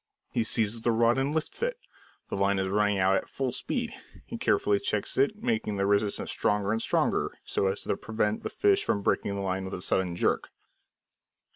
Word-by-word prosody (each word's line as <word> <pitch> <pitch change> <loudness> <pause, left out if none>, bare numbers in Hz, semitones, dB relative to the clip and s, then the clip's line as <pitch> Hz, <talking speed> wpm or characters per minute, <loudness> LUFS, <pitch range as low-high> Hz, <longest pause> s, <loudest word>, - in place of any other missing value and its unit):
He 120 - +1
seizes 110 0 +1
the 120 - +2
rod 115 +2 +3
and 135 +2 0
lifts 160 - -2
it. - - 0 0.5
The - - -2
line 100 0 +2
is 95 0 0
running 105 0 +2
out 95 0 +3
at - - -4
full 135 -2 -2
speed. - - -3 0.3
He - - -7
carefully 100 -1 +2
checks 105 0 -1
it, 210 +12 +1
making 225 - 0
the 100 - +1
resistance 100 +1 +1
stronger 105 -1 +1
and 115 0 0
stronger, - - 0
so 95 - 0
as 95 +1 -2
to - - 0
prevent 110 -1 -1
the - - -4
fish 405 0 +2
from 100 - 0
breaking 100 - 0
the 100 - -3
line 95 0 -1
with 95 0 -5
a 90 - -7
sudden 90 -2 0
jerk. - - 0
105 Hz, 200 wpm, -28 LUFS, 100-120 Hz, 0.5 s, rod